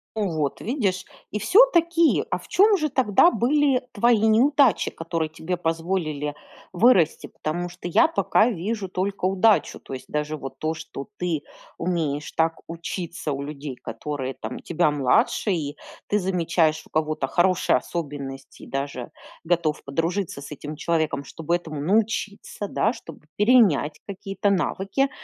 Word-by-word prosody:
Вот 160 -9 -1
видишь. 200 -7 -1 0.3
И 210 - -2
всё-таки, 335 - +4
а - - +1
в - - -15
чём 410 +1 +5
же 310 -2 0
тогда 255 - +4
были 275 +1 +2
твои 235 +1 +4
неудачи, 245 +4 +4
которые 165 -1 -3
тебе 160 +3 -4
позволили 165 -3 -2 0.4
вырасти? 185 -4 +3
Потому 175 +3 -4
что 175 0 -7
я 175 - +5
пока 245 -7 +2
вижу 205 +1 -3
только 190 +1 -2
удачу. 195 +3 +3
То - - -10
есть 130 - -7
даже 150 +1 -2
вот 135 -1 -8
то, 155 +2 -1
что 155 -2 -8
ты 170 -4 -1 0.4
умеешь 150 -5 -2
так 165 0 +1
учиться 170 -2 -4
у 135 - -4
людей, 140 -1 -6
которые 130 +3 -5
там 110 +3 -6
тебя 155 -2 +1
младше, 145 - +2
и 150 -4 -2 0.3
ты 210 - +2
замечаешь 170 -4 +1
у - - -20
кого-то 155 -3 -1
хорошие 185 +3 +2
особенности, 140 -5 -5
и - - -10
даже 135 -3 -4 0.3
готов 165 -3 0
подружиться 165 +2 -2
с 140 - -9
этим 150 +1 -8
человеком, 155 -4 -1
чтобы 165 +4 -1
этому 155 -4 -7
научиться, 205 +2 -1
да, 220 +4 +1
чтобы 165 - -12
перенять 210 - +4
какие-то 200 0 -2
навыки. 195 - 0
170 Hz, 145 wpm, -24 LUFS, 150-205 Hz, 0.4 s, чём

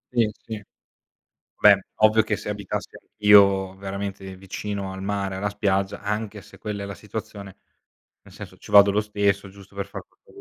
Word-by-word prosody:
Sì, 115 -3 +3
sì. 110 0 -9 1.0
Beh, - - +7 0.2
ovvio 110 +1 +5
che 105 -1 -1
se 105 - -8
abitassi 100 -2 -4
anch'io, 100 -2 +4
veramente, 95 -1 -6
vicino 100 +1 -5
al 95 - -7
mare, 100 -1 -2
alla 105 +2 -1
spiaggia, 100 -1 -1
anche 105 -1 -3
se - - -16
quella 105 -2 -5
è 100 - -5
la 100 - -6
situazione, 100 -1 -8 0.7
nel - - -17
senso, - - -10
ci - - -14
vado 100 0 +8
lo 105 +1 +2
stesso, 100 -2 0
giusto 100 0 -16
per 100 0 -3
fare 100 - -9
qualco - - -25
100 Hz, 175 wpm, -24 LUFS, 95-105 Hz, 1.0 s, vado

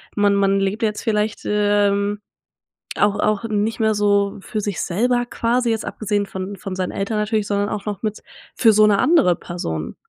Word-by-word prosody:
man 205 -1 +3
man 195 0 +2
lebt 200 +4 -1
jetzt 210 -1 -1
vielleicht, 215 -1 -1
ähm, 205 0 +1 0.8
auch 205 0 +2
auch 215 +1 0
nicht 215 0 -1
mehr 220 -1 +2
so 205 -1 +1
für 215 +2 -4
sich 205 -2 -3
selber 245 +6 0
quasi, 240 0 0
jetzt 225 0 -1
abgesehen 205 -1 -2
von 190 +1 -6
von 190 -1 -6
seinen 185 -1 -2
Eltern 210 +2 -2
natürlich, 210 -1 0
sondern 205 0 0
auch 205 - -4
noch 205 -2 -4
mit 215 -1 -3 0.3
für 225 -3 +5
so 215 +1 +5
'ne 205 -2 +3
andere 300 - +4
Person? 80 - -5
205 Hz, 185 wpm, -20 LUFS, 200-220 Hz, 0.8 s, für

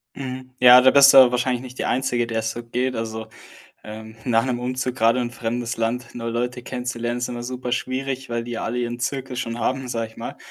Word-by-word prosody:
Mhm, 130 -1 -7
ja, 125 0 +9
da 130 +1 +6
bist 140 0 +8
du - - +8
aber 130 -2 +8
wahrscheinlich 125 0 0
nicht 130 0 -11
die - - -2
Einzige, 125 -2 0
der 115 -1 -2
es 110 0 -2
so 120 +1 -7
geht. 125 +2 -2
Also, 110 0 -5 0.6
ähm, 110 +1 -9
nach 115 -1 +2
'nem 125 -2 -2
Umzug 125 0 -3
gerade 115 0 +3
in 120 -1 -2
'n - - -16
fremdes 120 0 -3
Land 120 +2 -2
neue 115 -1 -4
Leute 125 +1 -2
kennenzulernen 120 -1 -4
ist 125 - -2
immer 120 -1 -5
super 125 0 -5
schwierig, 130 +1 -3
weil 115 0 -2
die 120 - -7
ja 115 - -4
alle 115 +2 -3
ihren 120 0 -3
Zirkel 135 +1 -3
schon 115 -1 -4
haben, 130 +2 -1
sage 115 -2 -3
ich - - -23
mal. - - -7
120 Hz, 240 wpm, -22 LUFS, 115-130 Hz, 0.6 s, ja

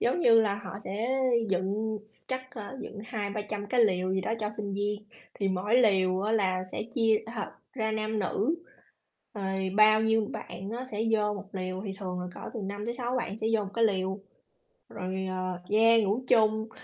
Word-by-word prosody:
giống 250 +9 +2
như 230 -7 +7
là 210 -2 +2
họ 200 -2 -7
sẽ 230 +7 -1 0.3
dựng 200 +4 0 0.3
chắc, 260 0 -4
ơ, 240 +2 -7
dựng 210 - -8
200-300 210 -2 -3
cái 245 +4 +2
lều 185 -2 +1
gì 190 - +1
đó 205 - -2
cho 210 -1 -1
sinh 210 -2 -4
viên. 205 +1 -1 0.3
Thì 195 - 0
mỗi 190 +4 0
lều 190 -5 +4
á, 210 +2 0
là 185 -4 +2
sẽ - - -2
chia, 225 -4 +4 0.2
ờ, 210 - -3 0.2
ra 220 -4 -1
nam 215 0 -1
nữ, 210 - +1 0.8
rồi 190 -2 -1
bao 215 0 +7
nhiêu 220 -1 +3
bạn 190 +3 -6
á 245 +3 -4
sẽ 215 +1 -1
vô 210 -1 +2
một 200 -1 -8
lều, 185 0 -3
thì 195 - -3
thường 180 -3 -3
là 180 - -4
cỡ - - -9
từ 230 - -3
5 200 +2 -4
tới 235 - -2
6 245 0 -2
bạn 215 -3 -3
sẽ 220 - -1
vô 215 -2 +2
một 195 - -7
cái 230 - +3
lều. 190 -2 0 0.7
Rồi, 190 0 -3
ờ, 185 -1 -2
yeah, 225 +2 +6
ngủ 210 +6 0
chung, 220 -1 +3
210 Hz, 200 wpm, -29 LUFS, 190-220 Hz, 0.8 s, như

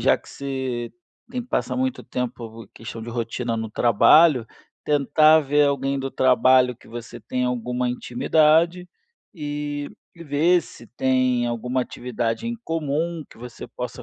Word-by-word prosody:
já - - +4
que - - -19
você 130 -4 -4 0.4
tem 250 -1 -3
que 245 - -18
passar - - -1
muito 260 0 -1
tempo 115 -3 -6
questão 115 0 -8
de 120 - -8
rotina 115 0 -3
no 110 -1 -4
trabalho, 125 +4 +5 0.4
tentar 155 +2 +4
ver 145 0 +2
alguém 140 0 -1
do 135 0 -4
trabalho 130 -1 +4
que - - -21
você 120 +1 -9
tenha 125 0 -2
alguma 125 +1 -2
intimidade, 160 +8 +2 0.5
e 145 -2 -4 0.3
e 170 - -9
ver 160 +4 +3
se 120 - -14
tem 130 -2 +2
alguma 125 +2 -1
atividade 120 - -3
em 235 0 -3
comum 165 +1 -2
que - - -16
você 120 +1 -9
possa 125 0 -7
130 Hz, 150 wpm, -23 LUFS, 120-150 Hz, 0.5 s, trabalho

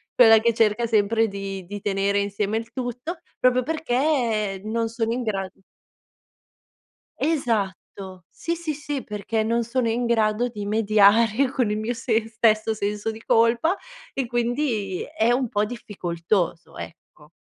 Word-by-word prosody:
quella 225 -3 +8
che 235 +1 +2
cerca 225 +1 +2
sempre 225 +1 +2
di 195 -2 -6
di 205 +1 -6
tenere 200 0 0
insieme 200 +1 -1
il 225 0 -6
tutto, 250 +8 -5 0.2
proprio 255 0 +4
perché 245 -8 0
non 225 +1 -1
sono 230 0 -1
in 250 - -2
gra 195 -5 -2 1.7
Esatto. 200 - -2
Sì, 335 - -3
sì, 330 -3 -4
sì, 285 -1 -4
perché 210 +1 -2
non 230 +2 +1
sono 235 0 0
in 240 +2 0
grado 230 0 +1
di 210 -3 -6
mediare 215 +3 +4
con 250 -6 0
il 210 - -1
mio 230 +2 -2
se 225 -2 0
stesso 220 -1 +2
senso 210 +1 -2
di 220 +1 -7
colpa 235 +10 +3 0.4
e 270 -3 -2
quindi 235 -5 -1
è 225 +2 0
un 250 -1 +1
po' 210 0 +1
difficoltoso, 180 -5 -3
ecco. 150 -2 -11
225 Hz, 145 wpm, -24 LUFS, 205-245 Hz, 1.7 s, quella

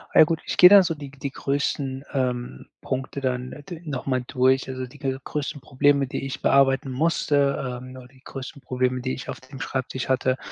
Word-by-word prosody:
Ja - - +10
gut, 165 0 0
ich - - -3
gehe 180 - +10
dann 200 -1 +9
so 165 -2 -1
die 145 -2 -8
g 140 - -18
die 140 0 -3
größten, 140 -1 -2
ähm, 125 - -2
Punkte 130 +1 -4
dann 125 -1 -1
n - - -8
äh, - - -12
d 170 +1 -9
nochmal 130 -3 -2
durch, 130 +1 +2
also 130 0 -4
die 130 +4 -15
g 135 -3 -1
größten 145 -1 -4
Probleme, 140 +1 +2
die 135 - -4
ich 135 0 -5
bearbeiten 135 0 +3
musste, 140 -3 +1
ähm, 130 0 -10
nur 130 -1 -11
die 130 0 -23
größten 135 +1 -8
Probleme, 125 0 -1
die 130 +1 -2
ich 135 - -7
auf - - -5
dem 130 +1 -12
Schreibtisch 130 -2 -3
hatte 130 0 +2
135 Hz, 215 wpm, -24 LUFS, 130-140 Hz, -, Ja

